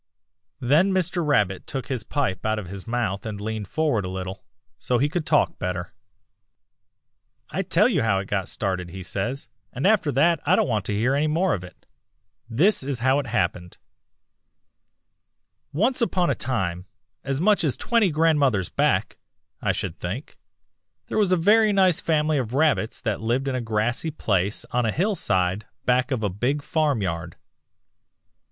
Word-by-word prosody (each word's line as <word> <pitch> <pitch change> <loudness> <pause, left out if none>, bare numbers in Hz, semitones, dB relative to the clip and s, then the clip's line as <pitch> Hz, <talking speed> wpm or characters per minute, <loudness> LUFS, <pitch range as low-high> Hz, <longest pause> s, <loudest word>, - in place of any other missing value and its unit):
"Then 155 +10 +3
Mr. 180 -2 0
Rabbit 105 -11 +1
took 135 -3 -4
his 130 -4 -3
pipe 125 - -2
out 110 0 0
of 105 - -4
his 100 +1 -7
mouth 115 -5 -1
and 105 -2 -5
leaned 110 -1 -4
forward 145 -5 0
a 90 - -4
little, 95 +1 -6 0.4
so 125 - 0
he 135 +5 +2
could 155 +1 -3
talk - - +2
better. 90 -1 -4 1.6
"'I - - -1
tell - - +3
you - - +1
how 110 -3 +2
it 95 - -2
got 95 -2 -1
started,' 95 -3 -2
he 95 +2 -8
says, 105 +10 -3 0.2
'and 135 - -3
after 195 -7 +3
that 160 +4 +3
I - - +4
don't - - +2
want 105 -5 -1
to 105 - -2
hear 120 +6 +1
any 145 +2 +1
more 170 +5 +1
of 90 - -3
it. 90 - -14 0.6
This 165 - +3
is 135 -1 -3
how 135 +2 +4
it 140 - -4
happened: 90 -6 -2 1.9
"'Once 225 - +2
upon 185 -6 +1
a - - +2
time, 95 -8 -2 0.4
as 135 0 -2
much 205 +1 +3
as 145 -5 +1
twenty 230 -5 +2
grandmothers 145 - +2
back, - - 0 0.4
I - - +1
should - - -4
think, 100 - -5 0.7
there - - 0
was 200 -3 +2
a 185 - +4
very 210 +5 +4
nice 190 -4 +3
family 155 -2 +1
of 125 -1 -3
Rabbits 145 -6 +1
that 110 -3 -2
lived 120 +5 0
in 135 - 0
a 130 - -1
grassy 115 +6 0
place 100 - -1
on 125 0 +1
a 110 - +1
hillside 105 - 0 0.2
back 125 +2 +2
of 130 -5 -2
a 105 - +1
big 125 +10 -1
farmyard. 110 - -1
125 Hz, 170 wpm, -24 LUFS, 100-155 Hz, 1.9 s, I